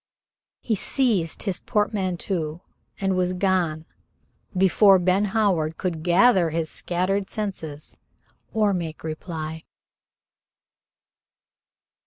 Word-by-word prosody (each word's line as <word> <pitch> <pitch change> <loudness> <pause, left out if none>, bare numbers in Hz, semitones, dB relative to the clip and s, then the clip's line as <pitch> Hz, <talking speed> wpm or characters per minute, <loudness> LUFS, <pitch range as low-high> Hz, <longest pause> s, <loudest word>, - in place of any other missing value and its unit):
He 230 - -1
seized 210 - +1
his 190 -4 -2
portmanteau 185 -6 -2 0.4
and 195 -1 0
was 180 0 +1
gone 180 -4 0 0.7
before 195 +1 +6
Ben 185 +3 +2
Howard 190 -7 +1
could 175 -4 -3
gather 180 +1 +4
his 160 0 -2
scattered 190 +3 -1
senses 165 -8 -5 0.5
or 210 -2 +2
make 165 -4 -4
reply. 160 0 -5
185 Hz, 90 wpm, -24 LUFS, 165-200 Hz, 0.7 s, before